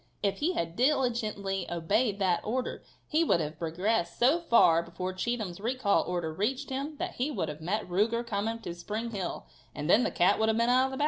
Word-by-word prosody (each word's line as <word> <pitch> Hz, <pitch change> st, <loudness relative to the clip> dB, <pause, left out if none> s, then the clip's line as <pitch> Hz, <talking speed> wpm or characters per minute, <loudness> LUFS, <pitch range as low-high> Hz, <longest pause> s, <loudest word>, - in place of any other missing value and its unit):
If 200 Hz, -1 st, 0 dB
he 335 Hz, +5 st, +1 dB
had 170 Hz, -, -3 dB
diligently 225 Hz, -8 st, 0 dB
obeyed 200 Hz, +6 st, +1 dB
that 185 Hz, -3 st, +1 dB
order 250 Hz, +4 st, -2 dB, 0.3 s
he 320 Hz, +2 st, +2 dB
would 240 Hz, -, +3 dB
have 155 Hz, -1 st, -4 dB
progressed 170 Hz, +2 st, -1 dB
so 275 Hz, +8 st, +4 dB
far 230 Hz, -, +5 dB
before 180 Hz, +2 st, -5 dB
Cheatham's 205 Hz, -3 st, -3 dB
recall 225 Hz, -2 st, +1 dB
order 175 Hz, -3 st, -2 dB
reached 260 Hz, -, -2 dB
him 280 Hz, +4 st, -3 dB
that 355 Hz, +2 st, -4 dB
he 255 Hz, +4 st, 0 dB
would 165 Hz, -, -2 dB
have 150 Hz, +1 st, -7 dB
met 200 Hz, +6 st, -2 dB
Ruger 220 Hz, +6 st, +1 dB
coming 225 Hz, +1 st, -2 dB
to 175 Hz, -, -5 dB
Spring 215 Hz, +7 st, -4 dB
Hill, 190 Hz, -, -4 dB, 0.3 s
and 150 Hz, +1 st, -4 dB
then 210 Hz, +7 st, +6 dB
the -, -, +1 dB
cat 175 Hz, -, +3 dB
would 220 Hz, 0 st, +3 dB
have 220 Hz, -, +2 dB
been 235 Hz, +1 st, +2 dB
out 255 Hz, +1 st, +4 dB
of 265 Hz, -, -3 dB
the -, -, -4 dB
bag. -, -, -7 dB
210 Hz, 215 wpm, -29 LUFS, 175-245 Hz, 0.3 s, then